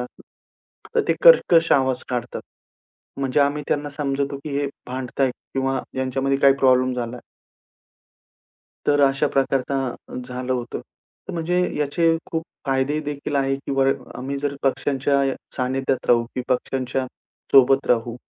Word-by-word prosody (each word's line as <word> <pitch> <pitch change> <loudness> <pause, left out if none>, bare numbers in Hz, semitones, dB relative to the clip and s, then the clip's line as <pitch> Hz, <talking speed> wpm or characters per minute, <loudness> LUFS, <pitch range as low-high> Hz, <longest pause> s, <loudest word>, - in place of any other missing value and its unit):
असेल, 125 - -9 0.7
तर - - +3
ते - - +4
कर्कश 175 - +6
आवाज 130 -2 +2
काढतात. 125 -2 -3 0.8
म्हणजे 135 +1 +1
आम्ही 145 +1 +1
त्यांना 145 0 0
समजतो, 140 -1 -2
की 150 - -5
हे 145 - 0 0.2
भांडतायत 130 +1 -1 0.2
किंवा 135 0 0 0.2
ह्यांच्यामध्ये 135 +1 0
काही 140 -1 +6
प्रॉब्लेम 130 -1 +3
झालाय. 120 0 -4 1.7
तर 145 0 +3
अशा 135 0 +3
प्रकारचा 135 -1 -1
झालं 125 0 -4
होतं. 125 -1 -3 0.5
म्हणजे 175 +2 0 0.2
याचे 165 +3 +2
खूप 165 -1 -1 0.2
फायदे 135 +3 +1
देखील 145 0 -4
आहे 135 0 +1
किंवा 135 -1 +1 0.3
आम्ही 135 +3 -4
जर 145 0 -2
पक्षांच्या 135 0 +1 0.2
सानिध्यात 130 +1 -1
राहू 120 -1 +4
किंवा 125 0 0
पक्षांच्या, 130 +1 -2 0.5
सोबत 135 0 +6
राहू, 120 0 +1
135 Hz, 130 wpm, -22 LUFS, 130-140 Hz, 1.7 s, कर्कश